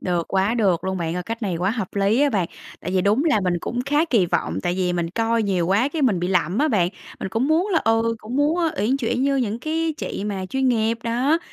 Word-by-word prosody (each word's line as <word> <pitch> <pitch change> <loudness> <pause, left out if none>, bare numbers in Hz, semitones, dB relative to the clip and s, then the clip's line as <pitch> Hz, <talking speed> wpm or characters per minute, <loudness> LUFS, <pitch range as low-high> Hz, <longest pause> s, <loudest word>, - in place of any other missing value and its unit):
Được, 175 -2 -1
quá 195 +4 +2
được 195 -8 +1
luôn 190 0 -1
bạn 165 0 -2
ơi, 180 - -2
cách 230 +4 -6
này 185 -5 -1
quá 185 +4 0
hợp 220 -6 -3
lý 200 +6 +2
á 290 -1 +3
bạn. 190 -6 0 0.3
Tại 180 - -5
vì 185 - +2
đúng 210 - +2
là 300 -10 +3
mình 180 -1 +1
cũng 245 - -3
khá 295 +4 +2
kỳ 225 - +2
vọng, 85 - -1
tại 175 - 0
vì 180 -1 0
mình 170 -1 -2
coi 230 +2 +1
nhiều 185 -4 0
quá 210 +8 +2
cái 305 0 -3
mình 205 -9 +2
bị 180 - -1
lậm 180 +1 +1
á 305 +2 +3
bạn, 180 -6 +2 0.3
mình - - -3
cũng 230 +8 0
muốn 340 +6 +2
là, 340 -5 +3
ừ, 225 +1 +2
cũng 225 +4 -6
muốn, 295 +4 +2
ơ, 330 -2 +2
uyển 235 +7 +2
chuyển 250 0 -1
như 275 0 +2
những 230 -4 -1
cái 320 +3 -1
chị 205 - -4
mà 195 -3 -3
chuyên 265 +4 0
nghiệp, 230 -1 +1
đó. 250 +8 +1
225 Hz, 270 wpm, -22 LUFS, 185-265 Hz, 0.3 s, á